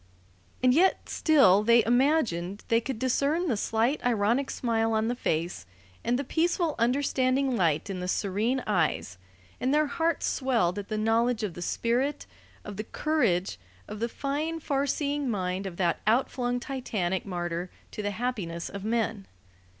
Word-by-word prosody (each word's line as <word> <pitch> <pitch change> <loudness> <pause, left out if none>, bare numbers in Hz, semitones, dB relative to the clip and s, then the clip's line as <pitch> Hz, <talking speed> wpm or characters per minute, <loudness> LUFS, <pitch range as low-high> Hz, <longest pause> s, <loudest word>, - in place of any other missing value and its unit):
And 255 -1 +5
yet 360 +7 +2
still 265 - +5
they 235 +2 +5
imagined 235 - +1
they 230 0 +3
could 260 0 -4
discern 280 +8 +1
the 250 - +1
slight 225 +7 0
ironic 235 +3 +1
smile 225 -2 0
on 220 +1 +1
the 245 - -1
face, 165 - -2 0.4
and 240 +1 +1
the 280 - -2
peaceful, 335 +2 0
understanding 260 +1 +1
light 165 -6 +1
in 195 -2 -4
the 180 - -4
serene 215 +8 0
eyes; 95 - 0 0.4
and 255 - 0
their 305 +1 +3
hearts 325 +2 0
swelled 225 -8 +1
at 200 - -7
the 215 - -3
knowledge 225 +2 +1
of 200 -5 -2
the 175 - -8
spirit, 245 +10 -1 0.4
of 205 -2 -7
the 215 - -3
courage, 215 - 0 0.3
of 210 - -7
the 235 +1 -1
fine, 300 +6 -2
far 280 -2 -1
seeing 285 -1 -1
mind 190 -2 -2
of 175 -2 -8
that 175 -3 +1
outflung 245 +1 +1
titanic 215 -9 -2
martyr 175 -1 -3 0.2
to - - -5
the 205 - -1
happiness 205 -7 -3
of 200 -1 -7
men. 220 -2 -1
230 Hz, 160 wpm, -28 LUFS, 195-270 Hz, 0.4 s, And